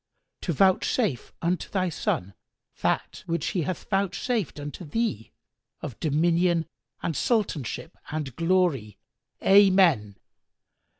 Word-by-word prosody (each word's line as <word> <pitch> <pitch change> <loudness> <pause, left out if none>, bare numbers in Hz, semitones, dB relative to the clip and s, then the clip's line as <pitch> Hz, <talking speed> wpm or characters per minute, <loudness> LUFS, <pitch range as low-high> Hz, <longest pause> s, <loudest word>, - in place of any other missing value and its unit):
to 175 - -1
vouchsafe 190 - +2
unto 175 +1 0
thy 185 -2 0
son 100 - -2 0.5
that - - -1
which 170 0 -1
He 185 - -1
hath 170 +3 -4
vouchsafed 195 - 0
unto 145 +5 -7
thee 150 - -2 0.5
of 120 - -7
dominion 165 +2 +2 0.4
and 165 - 0
Sultanship 180 - -1
and 150 -5 -4
glory! 165 - +1 0.5
Amen." 185 - +5
170 Hz, 105 wpm, -26 LUFS, 145-190 Hz, 0.5 s, Amen